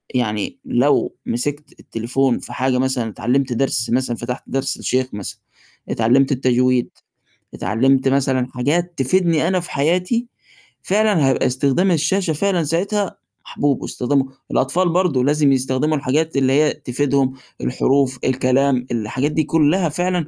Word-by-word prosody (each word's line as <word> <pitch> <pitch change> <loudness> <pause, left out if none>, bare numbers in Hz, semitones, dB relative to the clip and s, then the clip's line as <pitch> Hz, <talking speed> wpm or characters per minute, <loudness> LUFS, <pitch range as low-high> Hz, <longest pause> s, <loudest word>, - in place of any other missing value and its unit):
يعني 105 +1 -2
لو 130 +4 +1
مسكت 145 +5 -4
التليفون 125 +3 -1
في 120 - -9
حاجة 130 0 0
مثلًا 130 -3 0
اتعلِّمت 125 +3 -1
درس 120 -2 0
مثلًا 120 -1 0
فتحت 125 +2 -5
درس 135 0 -2
للشيخ 130 0 0
مثلًا 100 -2 -6 0.5
اتعلِّمت 130 +5 +2
التجويد، 125 -1 +2 0.6
اتعلِّمت 130 +7 +1
مثلًا 130 -2 +1
حاجات 165 +8 0
تفيدني 165 +3 +2
أنا 185 0 +1
في 175 - -6
حياتي، 180 - 0 0.6
فعلًا 200 -7 +2
هيبقى 135 - +2
استخدام 140 +9 +1
الشاشة 165 +2 +1
فعلًا 180 +1 0
ساعتها 195 +6 -1 0.3
محبوب 145 -2 -1
واستخدمه 135 +2 0 0.3
الأطفال 175 +8 +1
برضه 170 -7 +1
لازم 145 0 +3
يستخدموا 135 +4 +1
الحاجات 145 +3 -1
اللي 130 -1 +2
هي 150 +2 +3
تفيدهم، 135 0 0 0.3
الحروف، 130 0 +1
الكلام، 130 0 +1
الحاجات 120 +6 -1
دي 155 - +1
كُلّها 165 +3 +2
فعلًا 175 0 -1
135 Hz, 135 wpm, -19 LUFS, 125-160 Hz, 0.6 s, لازم